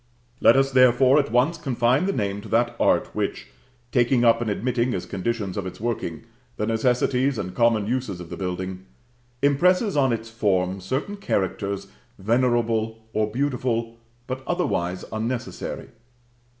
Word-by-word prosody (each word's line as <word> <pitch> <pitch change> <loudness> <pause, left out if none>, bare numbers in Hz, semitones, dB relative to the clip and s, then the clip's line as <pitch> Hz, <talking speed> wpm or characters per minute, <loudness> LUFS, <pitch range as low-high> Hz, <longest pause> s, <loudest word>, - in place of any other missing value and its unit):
Let - - +6
us, 135 0 +3
therefore, 130 +2 +5
at 140 -5 -1
once 125 +8 +2
confine 125 +3 +1
the - - +2
name 100 - -2
to - - -11
that 120 +1 +1
art - - +2
which, - - -3 0.4
taking 120 0 +3
up 115 0 +5
and 115 - -1
admitting, 120 +4 0
as 90 - -4
conditions 100 0 -3
of 95 -2 -3
its 95 - -9
working, 110 -7 -3 0.3
the 105 - -1
necessities 125 +3 +1
and 90 -3 -4
common 115 -3 +2
uses 115 -5 -2
of 85 -2 -10
the - - -4
building, 95 0 -5 0.6
impresses 180 - +3
on 135 -3 +3
its 115 -1 -3
form 95 -4 0
certain 135 - -3
characters 100 - -2 0.3
venerable 115 0 +1 0.2
or 110 0 +1
beautiful, 120 -2 -1 0.3
but 130 +1 -4
otherwise 95 - -1
unnecessary. 120 +3 -4
115 Hz, 150 wpm, -24 LUFS, 100-130 Hz, 0.6 s, Let